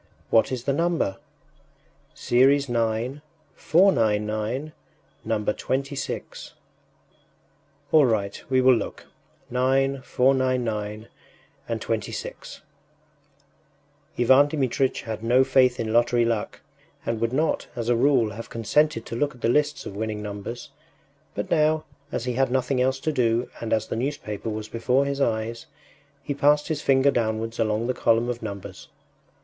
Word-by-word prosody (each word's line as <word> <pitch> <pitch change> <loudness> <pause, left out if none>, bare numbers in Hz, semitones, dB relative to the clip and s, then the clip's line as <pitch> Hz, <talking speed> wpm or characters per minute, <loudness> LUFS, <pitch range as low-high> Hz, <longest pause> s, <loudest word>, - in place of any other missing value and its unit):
” - - -34
“What 115 - +4
is 125 -2 -3
the 140 - 0
number?” 165 - 0 1.0
“Series 140 +3 +3
9,499, 120 - 0 0.5
number 105 -1 0
26.” 135 +3 -4 1.4
“All 150 -4 +6
right... 100 -4 -1
we 130 -1 +3
will 130 0 +6
look... 115 - -3 0.5
9,499 130 -4 0 0.6
and - - -1
26.” - - -5 1.6
Ivan 130 +4 +5
Dmitritch 135 -3 -1
had 110 -1 -5
no 125 +3 +4
faith 130 -1 +3
in 110 -1 -2
lottery 120 0 +3
luck, 115 -2 -2 0.4
and 115 -1 -2
would 115 0 +1
not, 155 +4 0
as 120 -2 -4
a 120 - +3
rule, 125 -3 +3
have 115 +3 -8
consented 115 +2 +1
to - - -6
look 145 +2 -1
at 125 - -18
the - - +1
lists 150 +3 +1
of 100 - -7
winning 105 0 -3
numbers, 105 +3 -7 0.6
but - - -4
now, 155 0 +2 0.3
as 115 - -3
he 125 - -1
had 135 +1 +1
nothing 130 0 0
else 130 +1 +1
to 155 - 0
do 120 -3 0
and 115 - -5
as 110 -1 +1
the - - -4
newspaper 115 -4 -3
was 110 0 -4
before 125 +5 +1
his 140 0 -2
eyes, 115 -1 -1 0.6
he 145 - -2
passed 145 +1 +2
his 155 -2 -2
finger 135 0 +4
downwards 115 -1 -2
along 110 0 0
the 130 - 0
column 115 0 +2
of 120 -1 -4
numbers. 100 -3 -7
125 Hz, 140 wpm, -24 LUFS, 115-135 Hz, 1.6 s, All